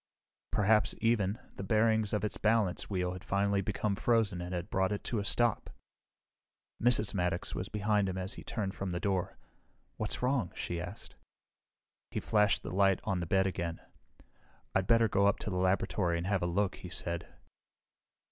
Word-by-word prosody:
Perhaps, 105 Hz, 0 st, +3 dB
even, 110 Hz, -3 st, +2 dB, 0.2 s
the -, -, -4 dB
bearings 110 Hz, +1 st, +2 dB
of 105 Hz, -, 0 dB
its 105 Hz, -, -3 dB
balance 110 Hz, -4 st, +1 dB
wheel 90 Hz, -2 st, -1 dB
had 90 Hz, -, -8 dB
finally 100 Hz, 0 st, +1 dB
become 105 Hz, +1 st, -1 dB
frozen 110 Hz, -4 st, +1 dB
and 90 Hz, +1 st, -5 dB
had 90 Hz, +2 st, -4 dB
brought 95 Hz, 0 st, +1 dB
it 105 Hz, -, -3 dB
to 115 Hz, -, -1 dB
a -, -, -2 dB
stop! 120 Hz, +2 st, +1 dB, 1.1 s
Mrs. 115 Hz, -3 st, +3 dB
Maddox 90 Hz, -2 st, -1 dB
was 90 Hz, -, -4 dB
behind 105 Hz, -1 st, +1 dB
him 95 Hz, -, -3 dB
as 95 Hz, +2 st, -4 dB
he -, -, -9 dB
turned 100 Hz, -4 st, -3 dB
from 95 Hz, -2 st, -4 dB
the 85 Hz, -, -1 dB
door. 95 Hz, -2 st, -1 dB, 0.6 s
"What's -, -, -2 dB
wrong?" 125 Hz, -9 st, +1 dB
she 85 Hz, -1 st, -3 dB
asked. 90 Hz, +5 st, -8 dB, 0.9 s
He -, -, -2 dB
flashed 105 Hz, -1 st, +2 dB
the -, -, -5 dB
light 95 Hz, 0 st, +3 dB
on 100 Hz, -4 st, -1 dB
the 85 Hz, -, -3 dB
bed 95 Hz, +2 st, +3 dB
again. 85 Hz, -3 st, -2 dB, 0.9 s
"I'd 95 Hz, -1 st, +1 dB
better 115 Hz, -1 st, +5 dB
go 100 Hz, -1 st, +3 dB
up 100 Hz, -, +3 dB
to 105 Hz, -, -3 dB
the 90 Hz, -, -1 dB
laboratory 95 Hz, -1 st, +1 dB
and 85 Hz, -, -3 dB
have 95 Hz, 0 st, +1 dB
a 85 Hz, -, 0 dB
look," 100 Hz, +3 st, 0 dB
he 90 Hz, -, -9 dB
said. 85 Hz, -1 st, -4 dB
100 Hz, 180 wpm, -32 LUFS, 90-105 Hz, 1.1 s, better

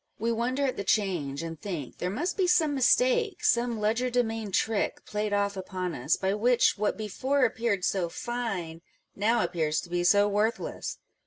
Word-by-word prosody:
We 230 Hz, +2 st, -1 dB
wonder 250 Hz, +4 st, 0 dB
at 260 Hz, -, -2 dB
the 200 Hz, -, -2 dB
change, 170 Hz, -9 st, 0 dB
and 165 Hz, -1 st, -7 dB
think 165 Hz, -10 st, -6 dB
there 180 Hz, -, -1 dB
must 320 Hz, -, -2 dB
be 375 Hz, -2 st, +1 dB
some 315 Hz, -4 st, +3 dB
mistake, 450 Hz, -, +2 dB
some 235 Hz, -1 st, +2 dB
legerdemain 225 Hz, -1 st, 0 dB
trick 220 Hz, +2 st, 0 dB
played 210 Hz, 0 st, -2 dB
off 200 Hz, 0 st, +1 dB
upon 185 Hz, -2 st, -4 dB
us, 135 Hz, +4 st, 0 dB
by 190 Hz, 0 st, 0 dB
which 235 Hz, +4 st, +3 dB
what 210 Hz, 0 st, -1 dB
before 255 Hz, +6 st, 0 dB
appeared 225 Hz, -5 st, 0 dB
so 180 Hz, -3 st, 0 dB
fine 195 Hz, -8 st, -4 dB, 0.3 s
now 225 Hz, +4 st, +2 dB
appears 160 Hz, -3 st, 0 dB
to 175 Hz, -, -12 dB
be 175 Hz, 0 st, 0 dB
so 205 Hz, +3 st, +5 dB
worthless. 210 Hz, +3 st, -1 dB
210 Hz, 170 wpm, -28 LUFS, 185-245 Hz, 0.3 s, so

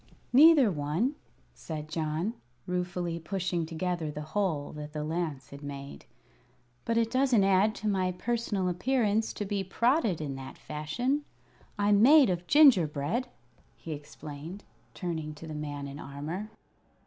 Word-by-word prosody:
"Neither 285 Hz, -4 st, +7 dB
one," 160 Hz, -, 0 dB, 0.4 s
said 155 Hz, -2 st, -6 dB
John, 160 Hz, +6 st, -2 dB, 0.3 s
ruefully 175 Hz, -1 st, -2 dB
pushing 175 Hz, -1 st, -2 dB
together 170 Hz, -1 st, -2 dB
the 150 Hz, 0 st, -5 dB
hole 175 Hz, -9 st, 0 dB
that 150 Hz, 0 st, -8 dB
the 150 Hz, -1 st, -3 dB
lance 155 Hz, -4 st, -3 dB
had 140 Hz, 0 st, -10 dB
made; 140 Hz, -, -8 dB, 0.8 s
"but 230 Hz, -, +1 dB
it 230 Hz, -1 st, +2 dB
doesn't 255 Hz, -5 st, +3 dB
add 195 Hz, +2 st, +3 dB
to 215 Hz, -, -4 dB
my 190 Hz, -3 st, +1 dB
personal 210 Hz, -1 st, -1 dB
appearance 220 Hz, +3 st, +1 dB
to 205 Hz, -, -4 dB
be 200 Hz, -1 st, -1 dB
prodded 235 Hz, -, +1 dB
in 145 Hz, -3 st, -3 dB
that 135 Hz, 0 st, -9 dB
fashion. 240 Hz, -, -2 dB, 0.5 s
I'm 205 Hz, 0 st, +4 dB
made 275 Hz, -2 st, +7 dB
of 175 Hz, 0 st, -3 dB
gingerbread," 210 Hz, -, +4 dB, 0.5 s
he 165 Hz, -, -9 dB
explained, 150 Hz, +4 st, -8 dB, 0.3 s
turning 160 Hz, -4 st, -4 dB
to 155 Hz, -, -10 dB
the 155 Hz, -, -6 dB
man 145 Hz, -2 st, -5 dB
in 140 Hz, +1 st, -8 dB
armor. 150 Hz, +10 st, -5 dB
175 Hz, 140 wpm, -29 LUFS, 150-215 Hz, 0.8 s, Neither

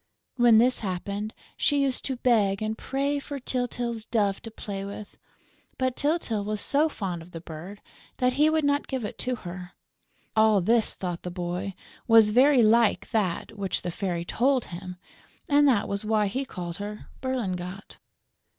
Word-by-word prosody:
When 240 Hz, -3 st, +6 dB
this 250 Hz, +3 st, +4 dB
happened, 200 Hz, +2 st, -3 dB, 0.3 s
she 290 Hz, -1 st, +2 dB
used 265 Hz, -2 st, -1 dB
to 265 Hz, -, -1 dB
beg 215 Hz, -6 st, +2 dB
and 215 Hz, 0 st, -1 dB
pray 280 Hz, +4 st, -1 dB
for 280 Hz, 0 st, -6 dB
Tyltyl's 245 Hz, -3 st, -2 dB
dove 205 Hz, -4 st, 0 dB
to 225 Hz, -, -8 dB
play 200 Hz, -3 st, -6 dB
with; 200 Hz, +1 st, -8 dB, 0.6 s
but 255 Hz, -1 st, 0 dB
Tyltyl 285 Hz, -9 st, 0 dB
was 210 Hz, +1 st, -3 dB
so 295 Hz, +8 st, +2 dB
fond 185 Hz, -, -4 dB
of 165 Hz, -, -13 dB
the 165 Hz, -, -5 dB
bird 170 Hz, +5 st, -9 dB, 0.3 s
that 250 Hz, -1 st, +2 dB
he 300 Hz, +4 st, +4 dB
would 315 Hz, 0 st, +1 dB
not 285 Hz, 0 st, +1 dB
give 260 Hz, -5 st, -3 dB
it -, -, -7 dB
to 250 Hz, 0 st, -1 dB
her. 180 Hz, -3 st, -8 dB, 0.6 s
All 220 Hz, -2 st, +5 dB
this, 225 Hz, +5 st, +2 dB
thought 175 Hz, -2 st, -4 dB
the 180 Hz, -, -5 dB
little 175 Hz, 0 st, -5 dB
boy, 180 Hz, +2 st, -3 dB, 0.3 s
was 225 Hz, -2 st, +7 dB
very 255 Hz, +2 st, +6 dB
like 225 Hz, 0 st, +3 dB
that 200 Hz, -3 st, -1 dB
which 195 Hz, -3 st, -2 dB
the 175 Hz, -, -2 dB
Fairy 175 Hz, -2 st, -3 dB
told 255 Hz, +5 st, +1 dB
him; 180 Hz, +1 st, -7 dB, 0.5 s
and 290 Hz, 0 st, +5 dB
that 235 Hz, -7 st, +3 dB
was 200 Hz, +1 st, -2 dB
why 215 Hz, -1 st, +2 dB
he 260 Hz, +8 st, -2 dB
called 175 Hz, -7 st, -6 dB
her 210 Hz, +1 st, -6 dB, 0.2 s
Berlingot. 195 Hz, -7 st, -4 dB
215 Hz, 175 wpm, -26 LUFS, 195-255 Hz, 0.6 s, was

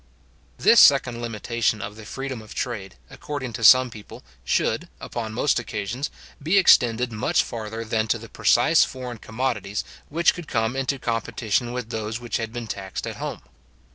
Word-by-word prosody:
This 230 Hz, -, +6 dB
second 125 Hz, -4 st, +5 dB
limitation 115 Hz, -1 st, -1 dB
of 105 Hz, +1 st, -6 dB
the 110 Hz, -1 st, -11 dB
freedom 135 Hz, 0 st, -5 dB
of 110 Hz, -, -12 dB
trade, 105 Hz, -, -4 dB, 0.2 s
according 130 Hz, -5 st, -6 dB
to 115 Hz, -, -5 dB
some 130 Hz, +2 st, +7 dB
people, 105 Hz, -2 st, -11 dB, 0.2 s
should, -, -, 0 dB
upon 115 Hz, -2 st, -5 dB
most 125 Hz, +4 st, +1 dB
occasions, 115 Hz, +4 st, -4 dB, 0.3 s
be 165 Hz, +7 st, +2 dB
extended 120 Hz, -9 st, +5 dB
much 110 Hz, -1 st, +1 dB
farther 110 Hz, 0 st, -6 dB
than 110 Hz, 0 st, 0 dB
to 115 Hz, -, +1 dB
the 115 Hz, +1 st, -11 dB
precise 120 Hz, +9 st, +4 dB
foreign 125 Hz, -3 st, -6 dB
commodities 110 Hz, -4 st, -3 dB, 0.3 s
which 170 Hz, +3 st, +3 dB
could 175 Hz, -4 st, -9 dB
come 110 Hz, +1 st, 0 dB
into 135 Hz, +1 st, -1 dB
competition 115 Hz, -1 st, -1 dB
with 125 Hz, -2 st, -5 dB
those 110 Hz, 0 st, -3 dB
which 120 Hz, -1 st, -3 dB
had 110 Hz, -1 st, -4 dB
been 120 Hz, 0 st, -5 dB
taxed 95 Hz, -3 st, -5 dB
at -, -, -6 dB
home. -, -, -5 dB
115 Hz, 170 wpm, -24 LUFS, 110-130 Hz, 0.3 s, some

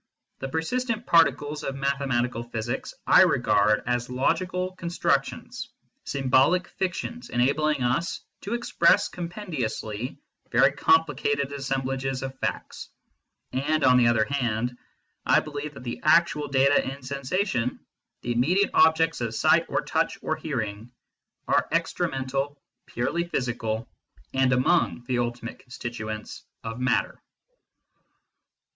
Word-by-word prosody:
The 135 Hz, -, -4 dB
persistent 230 Hz, -, -2 dB
particles 150 Hz, -2 st, +3 dB
of 135 Hz, -, -3 dB
mathematical 135 Hz, -4 st, -1 dB
physics 120 Hz, 0 st, -4 dB
I -, -, +7 dB
regard 105 Hz, 0 st, +3 dB
as 120 Hz, 0 st, -1 dB
logical 180 Hz, +8 st, -1 dB
constructions, 170 Hz, -1 st, -2 dB, 0.4 s
symbolic 135 Hz, +7 st, +2 dB
fictions 190 Hz, +6 st, -4 dB
enabling 140 Hz, +3 st, +1 dB
us 130 Hz, +8 st, 0 dB, 0.2 s
to 210 Hz, +4 st, -3 dB
express 235 Hz, -, +3 dB
compendiously 140 Hz, -, -4 dB, 0.3 s
very -, -, +5 dB
complicated 145 Hz, -3 st, +2 dB
assemblages 135 Hz, -1 st, -2 dB
of 135 Hz, 0 st, -5 dB
facts; -, -, -4 dB, 0.6 s
and, 150 Hz, +4 st, 0 dB
on 125 Hz, -1 st, +6 dB
the 120 Hz, -1 st, +5 dB
other 115 Hz, -2 st, +3 dB
hand, 125 Hz, -3 st, -1 dB, 0.5 s
I -, -, +4 dB
believe 150 Hz, 0 st, -6 dB
that 125 Hz, -, -10 dB
the 120 Hz, -1 st, -5 dB
actual 155 Hz, -2 st, +3 dB
data 140 Hz, +1 st, +3 dB
in 135 Hz, 0 st, -10 dB
sensation, 135 Hz, -, -1 dB, 0.4 s
the 120 Hz, -, -2 dB
immediate 165 Hz, +12 st, +2 dB
objects 160 Hz, -2 st, +4 dB
of 115 Hz, -2 st, -2 dB
sight -, -, +3 dB
or -, -, 0 dB
touch -, -, 0 dB
or -, -, 0 dB
hearing, 115 Hz, -6 st, -4 dB, 0.6 s
are -, -, +2 dB
extra 165 Hz, +1 st, 0 dB
mental, 135 Hz, +1 st, -3 dB, 0.3 s
purely 165 Hz, +8 st, -1 dB
physical, 115 Hz, -7 st, -2 dB, 0.5 s
and 130 Hz, -1 st, +3 dB
among 125 Hz, +1 st, +2 dB
the 125 Hz, 0 st, 0 dB
ultimate 120 Hz, -1 st, -4 dB
constituents 115 Hz, -4 st, -7 dB, 0.2 s
of 115 Hz, +1 st, -5 dB
matter. 125 Hz, 0 st, 0 dB
135 Hz, 120 wpm, -26 LUFS, 120-160 Hz, 0.6 s, I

